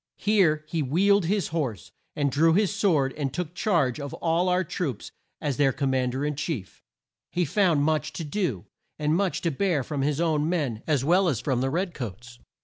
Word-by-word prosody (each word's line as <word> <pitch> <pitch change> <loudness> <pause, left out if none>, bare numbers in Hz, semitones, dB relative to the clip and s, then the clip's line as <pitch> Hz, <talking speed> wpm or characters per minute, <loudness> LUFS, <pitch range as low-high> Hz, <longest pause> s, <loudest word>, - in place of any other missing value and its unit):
Here 175 -8 +2
he 165 0 -1
wheeled 190 +7 +3
his 195 0 0
horse, 135 - -3 0.2
and 145 -2 0
drew 160 +4 +4
his 205 0 +2
sword 160 -10 +2
and 140 -3 -2
took 175 +2 -4
charge 170 - +1
of 140 -1 -5
all 170 +2 +1
our 180 +1 +2
troops 150 - -4 0.3
as 140 -4 -2
their 140 -2 +4
Com 135 +1 -1
mand 130 -1 0
er 140 +2 -1
in 150 0 -1
chief. 135 - -5 0.5
He 175 0 +1
found 165 -3 +2
much 155 0 0
to 170 - -5
do, 150 - -2 0.3
and 150 +1 +1
much 195 0 0
to 170 - 0
bear 155 -2 0
from 145 +1 -3
his 145 +1 0
own 160 -2 +1
men 140 -11 -1
as 145 -4 +1
well 180 +4 +4
as 130 -8 -1
from 125 -1 -1
the 135 - +1
red 175 +4 -1
coats. 120 - -8
155 Hz, 205 wpm, -26 LUFS, 135-175 Hz, 0.5 s, drew